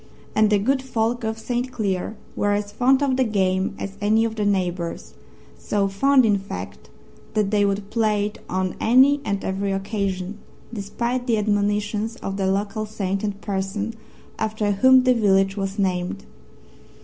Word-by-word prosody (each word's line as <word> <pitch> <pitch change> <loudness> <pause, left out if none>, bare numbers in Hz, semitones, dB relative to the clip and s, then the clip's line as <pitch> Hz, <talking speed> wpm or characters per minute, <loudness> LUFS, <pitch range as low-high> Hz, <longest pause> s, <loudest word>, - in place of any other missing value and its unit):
And 215 0 +4
the 210 - +4
good 260 +7 +1
folk 240 -2 -1
of 220 0 -2
St. 245 +3 -3
Cleer 205 -2 -2 0.2
were 205 0 +1
as 205 0 -2
fond 260 +5 +3
of 265 -2 +1
the 260 - +4
game 190 -3 0
as 195 0 -6
any 220 +2 +3
of 225 -1 -3
their 210 -2 0
neighbours 175 - -2 0.5
so 200 - 0
fond, 260 +6 +4
in 205 -2 +3
fact, 95 - -8 0.5
that 210 -2 +1
they 205 -1 +3
would 200 0 -2
play 215 -2 +1
it 210 - -6
on 185 0 -1
any 265 +5 +5
and 200 -4 -2
every 195 +1 -1
occasion, 195 0 -3 0.3
despite 235 +4 -3
the 230 -2 +2
admonitions 210 +1 0
of 195 -5 -5
their 195 -1 0
local 205 +2 -1
saint 195 -2 -3
and 205 -1 -3
parson, 200 +2 -3 0.5
after 215 -1 0
whom 260 +6 +6
the 255 0 +4
village 195 -4 +3
was 195 0 -3
named. 180 - -1
205 Hz, 165 wpm, -23 LUFS, 195-225 Hz, 0.5 s, whom